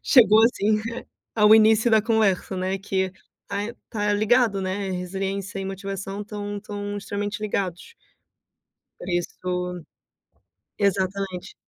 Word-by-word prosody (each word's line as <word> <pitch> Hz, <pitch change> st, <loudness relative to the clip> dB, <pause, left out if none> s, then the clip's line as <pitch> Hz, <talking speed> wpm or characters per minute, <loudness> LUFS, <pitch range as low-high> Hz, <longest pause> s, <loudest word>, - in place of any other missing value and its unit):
chegou, 220 Hz, -4 st, +6 dB
assim, 215 Hz, -3 st, +2 dB, 0.2 s
eh, 235 Hz, -, -7 dB, 0.3 s
ao 210 Hz, -1 st, +7 dB
início 220 Hz, +1 st, +5 dB
da 220 Hz, -1 st, +5 dB
conversa, 215 Hz, -4 st, +1 dB
né, 185 Hz, +1 st, -1 dB
que 190 Hz, -1 st, -1 dB, 0.4 s
tá 200 Hz, -, -3 dB, 0.3 s
tá 210 Hz, -2 st, 0 dB
ligado, 215 Hz, 0 st, +3 dB
né, 190 Hz, +1 st, -2 dB
resiliência 195 Hz, +2 st, -3 dB
e 195 Hz, -, -3 dB
motivação 195 Hz, +1 st, -5 dB
estão 205 Hz, 0 st, -5 dB
estão 205 Hz, 0 st, -5 dB
extremamente 205 Hz, +1 st, -4 dB
ligados. 195 Hz, -, -3 dB, 1.1 s
Por 175 Hz, -, -8 dB
isso 180 Hz, 0 st, -3 dB, 1.0 s
exatamente. 195 Hz, -2 st, -1 dB
200 Hz, 120 wpm, -24 LUFS, 190-210 Hz, 1.1 s, ao